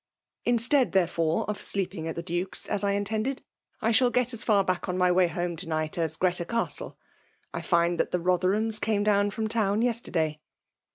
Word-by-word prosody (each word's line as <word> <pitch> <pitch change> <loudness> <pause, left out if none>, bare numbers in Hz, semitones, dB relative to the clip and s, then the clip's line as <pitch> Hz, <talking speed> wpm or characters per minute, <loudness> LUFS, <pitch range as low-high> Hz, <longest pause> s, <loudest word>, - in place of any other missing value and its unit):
'' - - -56
Instead, 245 - +3
therefore> 170 -3 +1
of 210 -1 -3
sleeping 185 -4 -3
at 165 - -4
the 170 - -4
Duke's^ 175 +3 -3
as 205 - -1
I 200 0 +2
intended, 220 +6 -2 0.4
I 225 - +3
shall 245 +2 +4
get 250 +1 +1
as 235 - -3
far 205 -3 +3
back 185 0 -2
on 180 - -1
my 180 -1 +3
way 180 0 +4
home 175 +1 -3
to 175 +1 -6
night 155 -1 -2
as 160 -2 -1
Ghreta 180 -1 +1
Castla 230 0 -3 0.6
I - - -3
find 170 -1 +1
that - - +1
the 180 - -1
Rotherhams 190 +5 +1
came 205 -1 +1
down 205 -1 +3
from 220 +2 -3
town 215 -1 +1
yesterday." 165 -10 -1
195 Hz, 195 wpm, -27 LUFS, 175-220 Hz, 0.6 s, shall